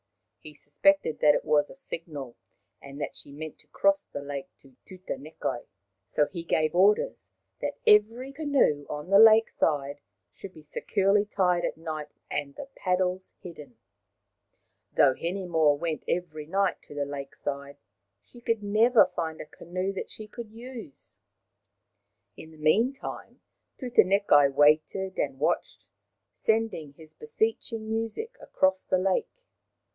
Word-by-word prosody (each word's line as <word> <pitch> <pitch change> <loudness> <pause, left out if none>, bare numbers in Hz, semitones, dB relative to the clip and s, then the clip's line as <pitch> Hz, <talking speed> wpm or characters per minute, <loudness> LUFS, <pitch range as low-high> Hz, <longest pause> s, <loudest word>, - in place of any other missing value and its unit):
He 150 -1 -12
suspected 155 - +1
that 150 -1 +5
it - - -2
was 145 -1 +3
a - - -12
signal, 155 - -6 0.5
and 140 +1 -10
that - - -4
she - - -10
meant 155 +2 -8
to - - -16
cross 195 0 +2
the 145 - -7
lake 140 -1 -5
to 135 -2 -21
Tutanekai. 155 -8 -5 0.4
So 150 - +2
he 170 +2 -7
gave 155 -2 +1
orders 205 - +2 0.3
that - - -3
every 225 +6 +4
canoe 280 - +1
on 150 +5 -6
the 200 - +7
lake 225 0 +7
side 145 -2 -1 0.3
should 190 - -11
be 155 - -13
securely 195 +6 +1
tied 180 -4 +1
at - - -2
night 155 -2 -5 0.2
and 140 -1 -3
the - - -7
paddles 185 0 0
hidden. 150 -9 -11 1.1
Though 135 -2 +5
Hinemoa 170 -3 +1
went 160 +1 -3
every 155 -4 -3
night 195 +2 0
to 145 - -12
the 145 -1 -1
lake 140 -1 -7
side, 140 0 -5 0.5
she 240 - -16
could 230 -2 -1
never 220 +4 +5
find 160 -2 -3
a - - -6
canoe 185 +5 -4
that 195 - -5
she 215 - -9
could 230 0 -9
use. 230 - -11 1.2
In 160 - -11
the 160 - -16
meantime 225 - 0 0.4
Tutanekai 200 - +4
waited 155 +6 +3
and 135 -2 -1
watched, - - -1 0.5
sending 220 -10 0
his 155 +1 -16
beseeching 220 +8 -2
music 225 - -3
across 190 0 +1
the 185 - +1
lake. 185 0 +1
175 Hz, 140 wpm, -27 LUFS, 150-210 Hz, 1.2 s, the